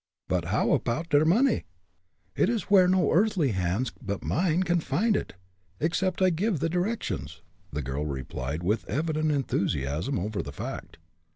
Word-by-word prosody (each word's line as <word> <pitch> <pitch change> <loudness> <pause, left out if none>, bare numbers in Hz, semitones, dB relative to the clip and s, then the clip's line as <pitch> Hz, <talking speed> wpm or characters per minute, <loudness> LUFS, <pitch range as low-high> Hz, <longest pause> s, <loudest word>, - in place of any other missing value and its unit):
But, - - 0
how - - +1
apoud 160 +9 -2
der 145 +1 +4
money?" 230 +10 +3 0.7
"It - - +3
is 230 -4 -2
where 185 -3 +7
no 185 0 +3
earthly 180 - +3
hands 95 +6 -1
but 100 0 -4
mine 175 +1 +1
can 175 -1 +2
find 195 +10 +1
it, - - -3 0.4
except 185 +3 0
I 185 - +5
give 180 +1 0
the 165 - 0
directions!" 180 +7 -3 0.3
the 75 0 -3
girl 70 +3 -3
replied, 70 +3 -4
with 105 +5 +1
evident 155 - 0
enthusiasm 85 - -1
over 100 +3 -2
the 70 - -7
fact. 70 - -7
155 Hz, 160 wpm, -27 LUFS, -, 0.7 s, where